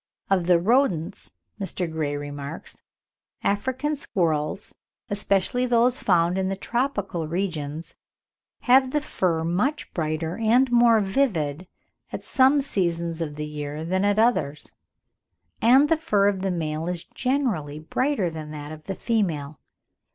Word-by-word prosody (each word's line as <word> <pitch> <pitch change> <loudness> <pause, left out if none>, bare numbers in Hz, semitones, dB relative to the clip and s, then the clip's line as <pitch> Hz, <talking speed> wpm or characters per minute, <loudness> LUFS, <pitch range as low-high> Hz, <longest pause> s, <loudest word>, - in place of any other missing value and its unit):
Of 180 -3 +2
the 180 -1 +6
Rodents, 195 - +1 0.2
Dr. 190 -2 -2
Gray 155 -3 -2
remarks: 145 +1 -7 0.6
"African 260 +8 0
squirrels, 170 - -1 0.4
especially 205 +5 +1
those 245 +1 +3
found 175 0 +2
in 190 0 0
the 195 - -1
tropical 205 - -2
regions, 160 -3 -3 0.7
have 260 +1 +5
the 295 - +2
fur 175 - -1
much 205 - -1
brighter 160 0 -2
and 240 +3 +3
more 235 -2 +5
vivid 185 - 0 0.4
at - - -5
some 270 +2 +4
seasons 170 - -1
of 150 -3 -3
the 150 0 -4
year 150 +1 -5
than 185 +3 0
at 205 0 +2
others, 220 -11 +1 0.9
and 260 +5 +6
the 325 - +3
fur 205 -11 +2
of 195 -2 0
the 195 - 0
male 160 -2 -2
is 175 -2 -3
generally 235 - -1
brighter 200 - -1
than 155 -1 -7
that 150 0 -7
of 155 0 -10
the 195 - -4
female." 165 - -1
185 Hz, 135 wpm, -25 LUFS, 160-235 Hz, 0.9 s, the